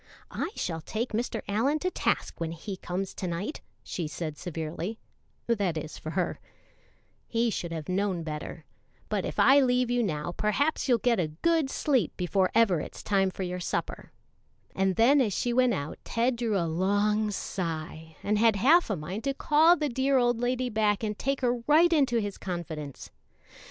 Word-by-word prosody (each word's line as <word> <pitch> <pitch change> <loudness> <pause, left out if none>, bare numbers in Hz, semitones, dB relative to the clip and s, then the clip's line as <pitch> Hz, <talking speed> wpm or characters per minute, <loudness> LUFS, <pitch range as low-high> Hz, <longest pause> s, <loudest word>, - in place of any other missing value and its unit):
"I - - -2
shall 165 -2 -3
take 225 +9 -3
Mr. 235 +3 -2
Allyn 230 +9 +1
to 365 +4 -2
task - - -1
when 165 0 -2
he 190 +4 -6
comes 185 +1 -4
to 185 - -4
night," 180 - -4 0.2
she 170 -4 -4
said 155 0 -5
severely 165 +5 -5 0.5
(that 200 -8 0
is, 155 0 -6
for 155 - -6
her); 175 +1 -1 0.9
"he 230 0 +1
should 170 -4 -4
have 160 -3 -5
known 185 -2 0
better; 155 0 -6 0.4
but - - -1
if - - -5
I 275 +2 +7
leave 250 -2 +2
you 245 0 +2
now 160 -6 -2
perhaps 260 - 0
you'll 245 - +5
get 235 0 +1
a 170 - +1 0.2
good 330 -4 +3
sleep 260 - 0
before 185 +1 +1
ever 215 -7 +4
it's - - -8
time 195 -2 +2
for 190 - -5
your 180 0 -3
supper;" 175 - -4 0.6
and 190 -1 +1
then 265 +7 +5
as 215 -6 +1
she 240 +5 0
went 250 -2 +3
out 145 -3 -5
Ted 240 +2 0
drew 230 -3 0
a 170 - +1
long 205 +5 +1
sigh, 160 -5 -5
and 210 +1 +1
had 225 -1 +5
half 290 - +4
a 205 - +1
mind 180 +7 -5
to 275 0 0
call 315 +5 +5
the 300 - 0
dear 265 +1 +1
old 240 -2 +2
lady 250 +1 -1
back 210 -1 +1
and 210 -1 -3
take 275 0 -1
her 245 -1 +1
right 330 +3 +5
into 270 -6 +3
his 205 -3 -3
confidence. 160 -6 -6
210 Hz, 185 wpm, -28 LUFS, 175-245 Hz, 0.9 s, I